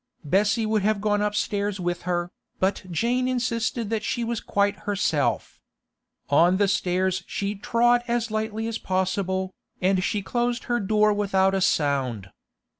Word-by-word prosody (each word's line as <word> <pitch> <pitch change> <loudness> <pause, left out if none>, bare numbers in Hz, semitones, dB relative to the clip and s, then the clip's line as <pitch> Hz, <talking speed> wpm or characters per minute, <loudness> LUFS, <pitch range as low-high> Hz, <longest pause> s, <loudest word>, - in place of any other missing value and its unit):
Bessie 205 +8 +2
would 215 -1 +1
have 210 +1 +1
gone 205 0 +1
upstairs 205 -1 -1
with 175 -1 -2
her, 175 0 -1 0.3
but 190 +1 +1
Jane 240 +8 0
insisted 235 -3 -1
that 220 -1 -1
she 240 - -1
was 230 -1 -2
quite 200 0 +1
herself. 165 -8 0 0.7
On 175 +6 +5
the 200 0 +3
stairs 185 -1 0
she 200 0 -2
trod 240 +4 +2
as 235 -1 -1
lightly 220 0 -2
as 230 - -3
possible, 190 0 -1 0.3
and 185 0 +2
she 205 0 -1
closed 240 +3 -1
her 240 -1 0
door 210 +1 +3
without 195 -2 +2
a 195 - 0
sound. 135 - 0
205 Hz, 150 wpm, -25 LUFS, 185-220 Hz, 0.7 s, On